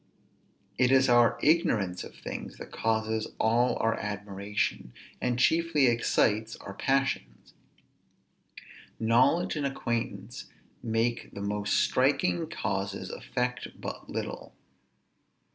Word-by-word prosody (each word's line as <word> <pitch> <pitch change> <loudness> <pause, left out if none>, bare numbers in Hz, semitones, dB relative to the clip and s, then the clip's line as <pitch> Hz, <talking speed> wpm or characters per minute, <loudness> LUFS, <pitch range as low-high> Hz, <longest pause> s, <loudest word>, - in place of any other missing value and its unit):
It 125 0 +4
is 135 0 +5
our 120 -1 +5
ignorance 105 - +2
of - - -11
things - - -7
that - - -10
causes 110 0 0
all 120 +3 +3
our 115 0 +2
admiration, 100 -8 -3 0.3
and 125 -1 0
chiefly 160 +2 +3
excites 115 -2 +2
our 100 - -9
passions. 135 - -1 1.5
Knowledge 120 +11 +3
and 145 - -1
acquaintance 115 -4 -4 0.4
make 115 0 -1
the 100 - -5
most 105 0 -1
striking 90 -1 +2
causes 95 -1 -3
affect 125 0 -4
but - - -7
little. - - -5
115 Hz, 105 wpm, -29 LUFS, 105-125 Hz, 1.5 s, is